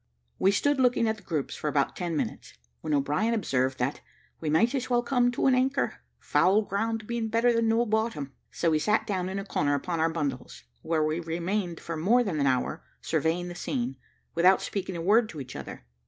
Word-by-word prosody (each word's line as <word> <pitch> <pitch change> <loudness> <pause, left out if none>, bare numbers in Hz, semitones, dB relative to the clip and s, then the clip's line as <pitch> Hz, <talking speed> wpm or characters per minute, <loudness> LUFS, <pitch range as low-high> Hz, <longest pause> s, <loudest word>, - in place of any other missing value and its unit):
We 190 - +4
stood 285 +8 +2
looking 250 -2 +3
at 220 0 0
the - - -15
groups 160 -7 -3
for - - -4
about 140 -1 +1
ten 170 -3 -2
minutes, - - -4 0.2
when - - -5
O'Brien 150 +12 +1
observed 130 - 0
that 130 +3 -2 0.4
"we 160 - -3
might 215 - +3
as 260 -2 -2
well 240 -1 +2
come 245 -1 +2
to - - -1
an 265 - +5
anchor, 260 +2 +1 0.2
foul 205 +4 +3
ground 220 +2 -2
being 235 0 -2
better 230 +2 +3
than 230 -1 +2
no 225 +2 +3
bottom;" 215 - -1 0.2
so 165 - 0
we 155 - +2
sat 210 +7 +1
down 185 -4 -2
in 190 - -4
a 195 - -4
corner 145 -7 +1
upon 165 +4 -2
our 165 +1 +3
bundles, 150 - -4 0.2
where 160 -1 0
we 155 +2 0
remained 175 +2 -2
for 170 - -5
more 215 +11 +3
than 180 -9 -2
an 140 - +2
hour, 125 - 0 0.2
surveying 170 +2 0
the 175 - -6
scene, 130 -6 -3 0.4
without 180 +3 +5
speaking 190 -2 -4
a 170 - -4
word 215 +4 +4
to 155 - -8
each 130 -2 -8
other. - - -8
185 Hz, 215 wpm, -27 LUFS, 155-225 Hz, 0.4 s, an